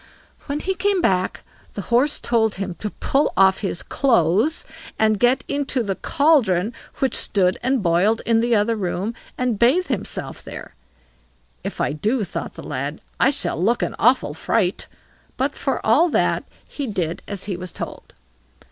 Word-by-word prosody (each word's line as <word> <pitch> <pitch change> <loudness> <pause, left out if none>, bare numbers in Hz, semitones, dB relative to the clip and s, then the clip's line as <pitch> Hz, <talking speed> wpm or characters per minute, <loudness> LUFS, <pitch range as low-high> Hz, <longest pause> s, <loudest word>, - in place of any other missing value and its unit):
When 285 +1 -2
he 385 - -1
came 395 +1 +1
back, 185 - 0 0.3
the 200 - -4
Horse 270 +5 +3
told 220 -3 +1
him 190 -1 -4
to 210 - -3
pull 275 +7 0
off 190 0 +5
his 190 -4 -3
clothes 230 - +2 0.3
and 215 -2 +2
get 250 +2 +3
into 275 -3 -1
the 200 -3 -1
cauldron 230 - +2 0.2
which 270 - 0
stood 185 -3 +1
and 255 -2 +1
boiled 185 +6 +2
in 230 -1 +3
the 235 0 +2
other 215 +2 +2
room, 195 +2 -2 0.2
and 245 -5 0
bathe 275 +10 +3
himself 230 -8 -4
there. - - -9 0.9
"If - - -5
I - - 0
do", 215 - 0
thought - - -5
the - - -9
lad, - - -4 0.2
"I - - +5
shall 280 - -2
look 235 +4 +2
an - - -2
awful 250 - +3
fright"; 180 +4 0 0.5
but 275 +2 0
for 270 - -1
all 290 +11 +5
that, - - +1 0.2
he 285 -2 -5
did 175 -6 -2
as 200 -2 -5
he 195 -3 -3
was 180 0 -7
told. - - -8
225 Hz, 165 wpm, -22 LUFS, 190-270 Hz, 0.9 s, off